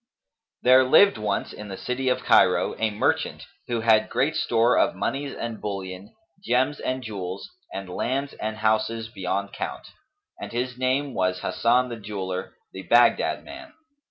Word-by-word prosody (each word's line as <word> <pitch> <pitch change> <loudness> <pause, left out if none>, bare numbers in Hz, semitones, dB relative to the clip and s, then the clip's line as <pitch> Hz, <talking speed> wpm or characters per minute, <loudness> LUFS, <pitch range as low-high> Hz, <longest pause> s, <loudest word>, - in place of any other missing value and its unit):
There 130 +1 +7
lived 200 - +5
once, 105 -2 -2
in 105 - -9
the 95 -1 -7
city 130 +1 -2
of 125 - 0
Cairo, - - +4
a 110 - +2
merchant 105 0 -1 0.2
who 120 -2 -1
had 110 -1 +4
great 155 +4 0
store 120 -5 +2
of - - +2
monies 135 +2 -3
and 115 -2 -5
bullion, 95 -1 -6 0.3
gems 130 +5 +1
and 130 0 -3
jewels, 95 -4 -6 0.2
and 95 -1 -6
lands 130 +9 -2
and 110 0 -4
houses 110 +1 0
beyond 100 -1 -3
count, - - -6 0.5
and - - -6
his 125 +2 -2
name 130 +2 0
was 90 0 0
Hasan 125 +2 +2
the 120 - -6
Jeweller, 95 -3 -5 0.2
the 95 - -7
Baghdad 120 +7 +3
man. 330 -1 -11
115 Hz, 155 wpm, -25 LUFS, 100-130 Hz, 0.5 s, There